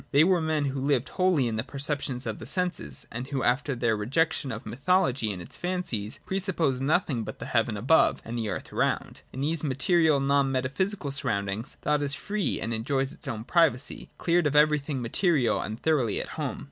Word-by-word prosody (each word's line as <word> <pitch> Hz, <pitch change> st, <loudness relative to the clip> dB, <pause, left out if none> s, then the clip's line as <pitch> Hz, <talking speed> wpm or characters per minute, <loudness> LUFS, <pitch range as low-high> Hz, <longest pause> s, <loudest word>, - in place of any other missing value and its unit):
They 145 Hz, +1 st, +5 dB
were 180 Hz, 0 st, +3 dB
men 155 Hz, -2 st, 0 dB
who 135 Hz, -1 st, -2 dB
lived 135 Hz, -2 st, +1 dB
wholly 180 Hz, -9 st, +2 dB
in 110 Hz, -1 st, -2 dB
the 110 Hz, -, 0 dB
perceptions 140 Hz, -1 st, -1 dB
of 110 Hz, -2 st, -4 dB
the 110 Hz, -, -8 dB
senses, 175 Hz, -, -2 dB
and 120 Hz, +3 st, -5 dB
who, 135 Hz, -2 st, -2 dB
after 130 Hz, +3 st, +1 dB
their 120 Hz, -2 st, +1 dB
rejection 135 Hz, +6 st, 0 dB
of 110 Hz, +2 st, -6 dB
mythology 130 Hz, -, +1 dB
and 95 Hz, -, -6 dB
its 85 Hz, -, -8 dB
fancies, 175 Hz, -, -3 dB
pre 190 Hz, -, -1 dB
sup 190 Hz, -1 st, -1 dB
posed 135 Hz, -6 st, +1 dB
nothing 140 Hz, -4 st, +1 dB
but -, -, -7 dB
the -, -, -7 dB
heaven 115 Hz, -2 st, +1 dB
above 135 Hz, +10 st, +4 dB
and 115 Hz, -, -5 dB
the 115 Hz, -3 st, -2 dB
earth -, -, -5 dB
around. -, -, -1 dB
In 130 Hz, -, -6 dB
these 155 Hz, +2 st, +1 dB
material, 155 Hz, +2 st, +3 dB
non 140 Hz, 0 st, +2 dB
metaphysical 140 Hz, +6 st, -1 dB
surroundings, 100 Hz, -4 st, -2 dB
thought 150 Hz, 0 st, +1 dB
is 145 Hz, 0 st, 0 dB
free 205 Hz, -5 st, -2 dB
and 115 Hz, -, -2 dB
enjoys 135 Hz, +4 st, -1 dB
its -, -, -7 dB
own 115 Hz, -4 st, -4 dB
privacy, 140 Hz, -3 st, +1 dB
— -, -, -38 dB
cleared 170 Hz, -2 st, +2 dB
of 145 Hz, -, -2 dB
everything 150 Hz, -3 st, +3 dB
material, 140 Hz, -, +2 dB
and 110 Hz, +2 st, -5 dB
thoroughly 135 Hz, -10 st, +1 dB
at -, -, -5 dB
home. 150 Hz, -4 st, -4 dB
140 Hz, 205 wpm, -27 LUFS, 120-160 Hz, -, They